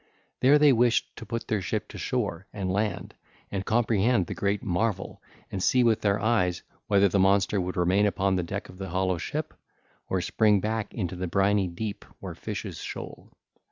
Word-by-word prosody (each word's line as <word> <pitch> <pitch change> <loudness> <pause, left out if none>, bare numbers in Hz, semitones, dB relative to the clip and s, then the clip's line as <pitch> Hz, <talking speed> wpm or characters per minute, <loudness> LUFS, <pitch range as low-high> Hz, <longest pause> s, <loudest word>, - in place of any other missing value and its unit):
There 140 +3 +6
they 150 -2 +6
wished 120 0 +2
to - - -9
put 115 -1 -4
their 105 -3 0
ship 90 - -2
to - - -9
shore, 90 +4 -2
and 95 -3 -3
land 105 +1 -2 0.4
and 95 -1 -2
comprehend 110 -2 +2
the - - -5
great 100 0 -1
marvel 95 +1 -2 0.3
and 95 - -3
see 125 +6 +4
with 110 -2 +3
their 100 -1 +2
eyes 95 -5 +1 0.2
whether 100 -1 +4
the 100 +1 +1
monster 95 +1 +3
would 90 +1 -4
remain 95 +4 +3
upon 95 -1 +1
the 90 - +1
deck 85 - -5
of 90 - -14
the 95 - -5
hollow 95 0 0
ship, - - -4 0.6
or 95 - +1
spring 105 +2 +3
back 110 +2 -2
into 90 -5 -3
the 90 0 -3
briny 100 +2 +2
deep 100 +4 -5 0.2
where - - -6
fishes - - -6
shoal. - - -8
100 Hz, 190 wpm, -27 LUFS, 95-110 Hz, 0.6 s, There